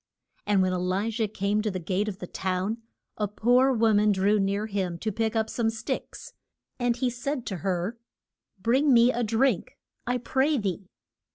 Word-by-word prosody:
And 200 -2 +3
when 185 0 +1
E - - 0
li 185 +5 -1
jah 220 -1 0
came 205 +1 0
to 215 - -1
the 190 - -3
gate 185 +4 -1
of 200 -3 -4
the 180 - -7
town, 190 +5 -2 0.4
a 210 - 0
poor 245 +6 +3
wo 225 -3 +3
man 210 0 +4
drew 200 +2 +2
near 200 +2 0
him 190 -5 -2
to 215 +5 -2
pick 225 +2 -1
up 220 -1 +1
some 225 -1 0
sticks. 225 0 -5 0.5
And 245 -1 +1
he 255 -2 0
said 250 +2 -3
to 190 - -3
her, 185 +5 -2 0.6
Bring 260 +8 +3
me 240 +1 +6
a 245 - -2
drink, 225 -1 +1 0.3
I 250 +1 +1
pray 265 +5 +1
thee. 195 -3 -3
215 Hz, 190 wpm, -27 LUFS, 195-235 Hz, 0.6 s, me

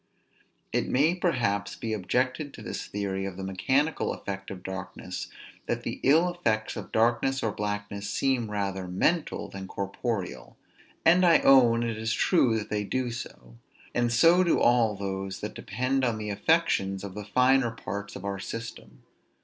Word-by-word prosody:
It - - 0
may 145 +6 +3
perhaps 120 - 0
be 110 -1 -4
objected 125 - -1
to - - -10
this - - -5
theory 100 -1 -3
of 95 -2 -7
the 95 - -5
mechanical 130 - 0
effect 95 -1 -6
of 90 -2 -8
darkness, 95 -1 -6 0.4
that - - -2
the - - -4
ill 160 +6 +5
effects 110 -11 -1
of - - -7
darkness 120 +4 +2
or 110 - +1
blackness 105 -1 -4
seem 130 -2 0
rather 100 -2 -2
mental 150 - 0
than 95 -1 -8
corporeal: 100 - -4 0.5
and 175 +3 +6
I 170 -2 +7
own 120 -4 +6
it 115 -2 -2
is 110 0 -1
true 125 -11 +3
that 105 - -5
they 105 -1 0
do 125 +3 -2
so; 60 - -9 0.4
and 120 -1 +1
so 165 +10 +5
do 170 - +2
all 120 -3 +4
those 95 -1 -4
that - - -4
depend 130 +6 -1
on 120 -3 +1
the 105 -1 -4
affections 100 - +1
of 100 -2 -6
the 105 +1 -6
finer 125 +4 +3
parts 105 -2 -6
of 100 - -8
our 100 -1 -3
system. 115 +4 -8
110 Hz, 165 wpm, -27 LUFS, 100-130 Hz, 0.5 s, I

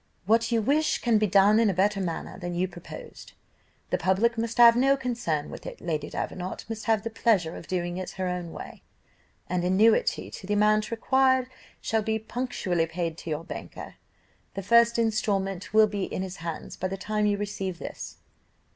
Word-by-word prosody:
"'What 230 +3 +2
you 230 -2 +2
wish 300 +6 +2
can 230 -3 +2
be 215 - +2
done 200 +3 +5
in 230 -2 +4
a 190 - -1
better 195 +2 +2
manner 170 -3 -4
than 175 0 -4
you 180 +2 +1
proposed. 185 - -11 0.6
The - - +1
public 205 +6 +2
must 230 +1 -3
have 235 -1 +8
no 270 +3 +3
concern 235 - -2
with - - -9
it; - - -8
Lady 155 -3 -3
Davenant 185 0 -5
must 220 -1 -6
have 220 -2 +2
the 230 - -4
pleasure 200 -7 +1
of 155 - -10
doing 175 0 -2
it 185 - -4
her 185 -1 -1
own 180 -2 -4
way; - - -9 0.7
an 180 0 -1
annuity 200 +5 +3
to 190 - -9
the 205 - +1
amount 215 +1 +3
required 260 +2 +2 0.3
shall 220 0 0
be 220 +1 -1
punctually 220 -7 -2
paid 165 -1 -3
to - - -7
your 155 +1 -2
banker. - - -8 0.6
The 195 - -4
first 235 +3 +5
instalment 200 -4 -1
will 215 +1 +6
be 205 -2 -2
in 185 - -4
his 190 0 -6
hands 165 -1 -6
by 185 - -2
the 195 +1 -5
time 210 +2 0
you 205 -1 +1
receive 195 -3 -4
this. - - -8
205 Hz, 190 wpm, -27 LUFS, 180-230 Hz, 0.7 s, have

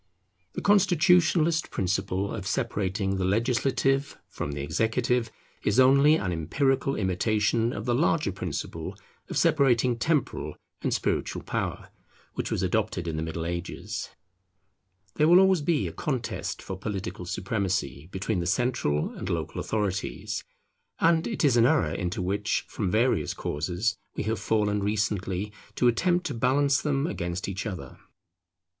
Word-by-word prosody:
The - - -5
constitutionalist 175 -4 +4
principle 95 +1 -1
of 95 - -5
separating 100 -5 -1
the 95 - -1
legislative 130 +6 +1
from 75 - -5
the 70 -1 -4
executive 115 - 0 0.3
is 105 +5 +2
only 140 +4 +6
an 95 - -1
empirical 135 - 0
imitation 110 +4 +1
of 105 - -5
the 120 - +1
larger 150 -2 +2
principle 90 -4 -5 0.3
of - - -3
separating 130 -7 +3
temporal 150 0 0 0.3
and - - -1
spiritual - - -1
power, - - -3 0.4
which - - -3
was - - -1
adopted 85 - 0
in 80 - -2
the 80 - -2
Middle 80 0 -4
Ages. 85 +1 -4 1.1
There 150 - +4
will 175 +2 +8
always 190 -3 +4
be 155 0 +1
a - - -5
contest 130 -6 -3
for 95 - -5
political 95 -4 -4
supremacy 95 - -2
between 95 +1 -1
the 85 - -2
central 100 - 0
and - - -6
local - - -2
authorities; 100 -3 -2 0.6
and 165 0 +3
it 220 -8 0
is 130 -4 +4
an 120 0 +6
error 80 -8 +2
into 90 0 -2
which, 100 +4 -1
from 100 -4 -2
various 115 +6 +1
causes, 90 +9 -2 0.2
we - - -2
have 110 0 -1
fallen 105 -1 +1
recently, 100 -1 -1 0.2
to 125 - +3
attempt 175 +9 +2
to 145 - -2
balance 135 +4 +2
them 140 -1 0
against 85 - -3
each 100 +3 -3
other. 85 -11 -7
110 Hz, 145 wpm, -27 LUFS, 95-135 Hz, 1.1 s, will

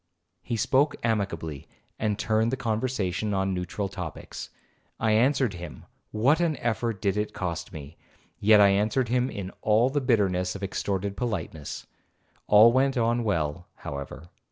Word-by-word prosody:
He 115 +4 -3
spoke 140 +7 +2
amicably, 85 -10 -2 0.3
and 105 -2 0
turned 110 +1 +1
the 130 - -1
conversation 110 -4 -1
on 95 0 0
neutral 90 +3 -3
topics. 90 -5 -7 0.5
I 110 -1 +2
answered 125 +1 +3
him,—what 105 - -2
an 165 -4 +1
effort 115 -3 -1
did 100 0 +1
it 105 0 -2
cost 85 -3 -4
me!—yet 85 +7 0
I 100 -1 +7
answered 110 +5 +1
him 125 +1 +1
in 95 -5 -6
all 110 +4 +3
the 145 +1 0
bitterness 95 -7 +1
of 100 - -7
extorted 100 0 -2
politeness. 85 - -4 0.6
All 105 +3 +8
went 135 +2 +2
on 120 0 +1
well, 85 -5 -1
however. 70 +3 -7
105 Hz, 140 wpm, -26 LUFS, 95-120 Hz, 0.6 s, All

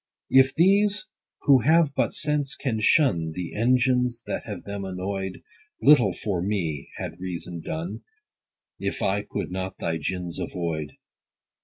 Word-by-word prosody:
If 130 0 +5
these 200 +4 +3 0.4
who 135 -2 +6
have 155 +3 +4
but - - +1
sense, 145 -3 -1
can 120 -6 -2
shun 95 - +3
The 90 -2 -5
engines, 125 +1 +2
that - - -4
have 105 -5 -6
them 100 0 -5
annoy'd; 95 0 -4 0.4
Little 145 -4 +6
for 100 -5 -2
me 85 -7 -2
had 85 - -6
reason 90 -2 -5
done, 85 +7 -4 0.8
If - - -3
I 100 +2 +1
could 100 - -5
not 95 0 -4
thy 80 -1 -2
gins 90 +2 -4
avoid. 80 -5 -3
100 Hz, 140 wpm, -25 LUFS, 90-130 Hz, 0.8 s, who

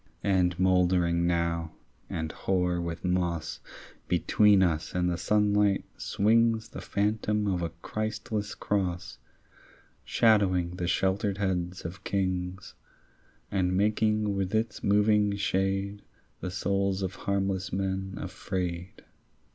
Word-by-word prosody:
And 90 -3 +2
mouldering 90 -2 +3
now 85 -1 0 0.4
and 80 -1 -3
hoar 90 -2 0
with 85 +1 -5
moss 90 -3 -1 0.5
Between 95 +3 +4
us 80 -3 -1
and 90 0 +1
the - - 0
sunlight 105 +1 +2
swings 115 +2 +2
The - - -8
phantom 105 +1 0
of 95 -3 0
a 85 - -1
Christless 110 -1 -3
cross 90 -4 -2 0.8
Shadowing 95 -6 +2
the 90 -1 -2
sheltered 95 +2 +1
heads 90 -2 -2
of 85 +3 -7
kings 95 -1 -2 0.8
And 90 -2 +1
making 105 0 +1
with 95 +1 -1
its 110 0 -1
moving 105 0 +3
shade 100 +1 -1 0.4
The 90 - -4
souls 100 +1 0
of 95 0 -2
harmless 95 -1 0
men 95 0 -2
afraid. 90 -1 -4
95 Hz, 115 wpm, -28 LUFS, 90-100 Hz, 0.8 s, Between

